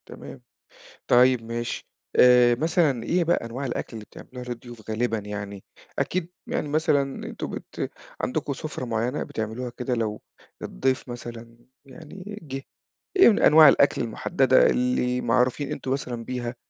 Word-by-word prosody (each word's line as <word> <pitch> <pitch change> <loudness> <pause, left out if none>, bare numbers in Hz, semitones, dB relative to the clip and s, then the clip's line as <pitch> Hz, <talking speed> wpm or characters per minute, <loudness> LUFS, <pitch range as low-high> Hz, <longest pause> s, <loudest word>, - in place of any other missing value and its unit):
تمام. - - -10 0.7
طيب 125 0 +5
ماشي. 115 +1 -5 0.3
آآ 125 -1 +7
مثلًا 150 -2 +1
إيه 175 0 +1
بقى 170 - +3
أنواع 130 +4 -4
الأكل 120 - -4
اللي 110 - -8
بتعملوها 125 +3 -11
للضيوف 120 -2 -8
غالبًا 115 +1 0
يعني؟ 100 -1 -7 0.3
أكيد 180 -2 -1 0.2
يعني 150 - -1
مثلًا 145 -3 0
أنتم - - -6
بت - - -5 0.3
عندكم 145 +1 -2
سُفرة 140 -1 -5
معيّنة 120 +4 -1
بتعملوها 110 +3 -4
كده 125 0 -2
لو 110 -3 -2 0.4
الضيف 130 - -1
مثلًا 115 -1 -9 0.3
يعني 185 +9 -10
جِه، 135 -3 -6 0.5
إيه 380 - +8
من 215 - +4
أنواع 155 0 +8
الأكل 140 -1 +4
المُحدّدة 130 +3 +3
اللي 125 0 0
معروفين 130 +4 +1
أنتم 135 -3 -5
مثلًا 125 -4 -3
بيها، 125 0 -4
125 Hz, 140 wpm, -25 LUFS, 115-140 Hz, 0.7 s, إيه